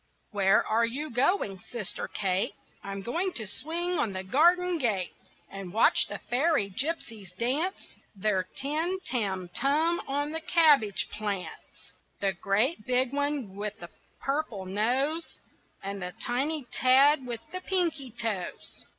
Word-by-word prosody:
Where 195 -2 +3
are 225 +2 +2
you 270 +6 -2
going, 245 - +1
sister 215 +1 -5
Kate? 190 -2 -1 0.3
I'm 195 0 -5
going 345 - -1
to 220 - -3
swing 335 - -1
on 210 - 0
the 185 0 -4
garden 345 - +3
gate, 205 - 0 0.4
And 195 -2 -8
watch 220 +4 +4
the - - -5
fairy 255 -5 +1
gypsies 225 - -3
dance 290 - -1 0.2
Their 195 -1 +1
tim 315 +7 -1
tam 190 -7 -1
tum 315 +5 +2
on 290 +2 -1
the 320 +1 -2
cabbage 295 - +4
plants 205 -3 -6 0.3
The 195 -1 +1
great 210 - +1
big 255 +1 +2
one 285 -8 -1
with 210 +1 -4
the 175 - -10 0.3
purple 270 -9 -2
nose, 255 - 0 0.5
And 200 0 -4
the 180 0 -5
tiny 275 +4 -1
tad 265 +2 +5
with 235 -2 -4
the 370 - -4
pinky 340 -8 +1
toes. 220 -6 -5
245 Hz, 140 wpm, -28 LUFS, 200-305 Hz, 0.5 s, tad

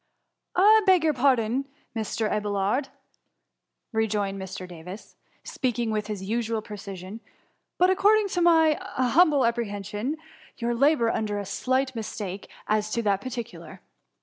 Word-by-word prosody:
^ - - +4
I 430 +3 +7
beg 370 -3 +5
your 310 -1 +3
pardon, 255 -1 +2 0.3
Mr. 220 0 -1
Abelwd,^ 210 +5 0 1.0
rejoined 210 -3 -1
Mr. 190 0 -7
Davis, 180 +3 -10 0.3
speaking 240 -3 -2
with 210 -1 -2
his 205 -3 -5
usual 225 +1 -2
precision, 200 -1 -8 0.3
" - - -48
but, 365 +1 +4
according 415 +2 +4
to 355 - -1
my 320 -3 +5
humble 275 +2 +3
apprehension, 220 +3 -2 0.4
yod 235 0 -1
labour 275 -4 +3
under 210 -2 -2
a 200 - -4
slight 260 +6 0
mistake 210 -4 -6 0.2
as 215 0 +1
to 235 - 0
that 200 -2 +1
particular. 240 -2 -7
230 Hz, 135 wpm, -26 LUFS, 205-275 Hz, 1.0 s, I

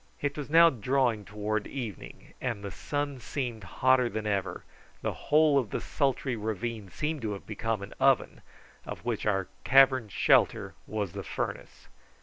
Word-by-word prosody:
It 145 0 -2
was 145 -2 -5
now 165 +1 +7
drawing 120 -2 0
towards 105 0 -2
evening, 115 - -7
and 115 -5 -3
the 100 - -5
sun 145 +2 -3
seemed 120 -4 -4
hotter 125 +5 +3
than 110 -1 -4
ever; 100 -3 -2 0.4
the - - -1
whole 150 -2 +3
of 120 -6 -3
the - - -2
sultry 135 -3 -1
ravine 110 -1 -4
seemed 150 - -3
to 110 -2 -2
have 100 - -8
become 110 -1 -2
an 100 - -9
oven, - - +3 0.4
of - - -8
which 115 -3 -1
our 95 -3 +1 0.2
cavern 130 -4 +5
shelter - - +3
was 105 -4 -2
the - - -5
furnace. - - -5
115 Hz, 160 wpm, -29 LUFS, 105-135 Hz, 0.4 s, now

